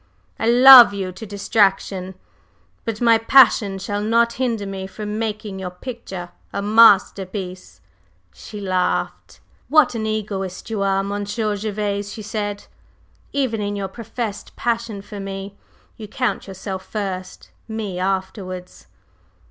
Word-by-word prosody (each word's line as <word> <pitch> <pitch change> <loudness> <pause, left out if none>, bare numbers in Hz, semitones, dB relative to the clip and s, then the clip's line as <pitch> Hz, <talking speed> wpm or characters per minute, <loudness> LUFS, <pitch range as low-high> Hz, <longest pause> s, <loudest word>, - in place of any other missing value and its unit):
I 225 - 0
love 245 -2 +9
you 190 -2 -3
to 215 +5 -10
distraction; 195 -2 0 0.7
but 225 -1 -4
my 230 -1 +5
passion 225 -5 +5
shall 205 +2 -3
not 230 +2 +2
hinder 230 -5 -1
me 195 -1 -5
from 210 +1 -5
making 215 -3 -4
your 185 -1 -4
picture 185 -3 -8 0.2
a - - -3
masterpiece." 195 - +2 0.5
She 210 - -10
laughed. 185 -2 -2 0.3
"What 310 -2 +5
an 220 -2 -3
egoist 200 -2 -4
you 215 -3 -2
are, 195 0 +1
Monsieur 205 +2 -2
Gervase!" 205 -1 -3
she 215 - -8
said. 205 -1 -4 0.7
"Even 255 -6 -1
in 205 0 -2
your 195 -1 -4
professed 225 0 -6
passion 230 -4 -2
for 205 0 -9
me 195 0 -6 0.4
you 215 - -8
count 250 0 -2
yourself 190 0 -6
first, 190 -3 -6 0.2
me 215 -5 -4
afterwards!" 185 -1 -4
205 Hz, 130 wpm, -21 LUFS, 195-225 Hz, 0.7 s, love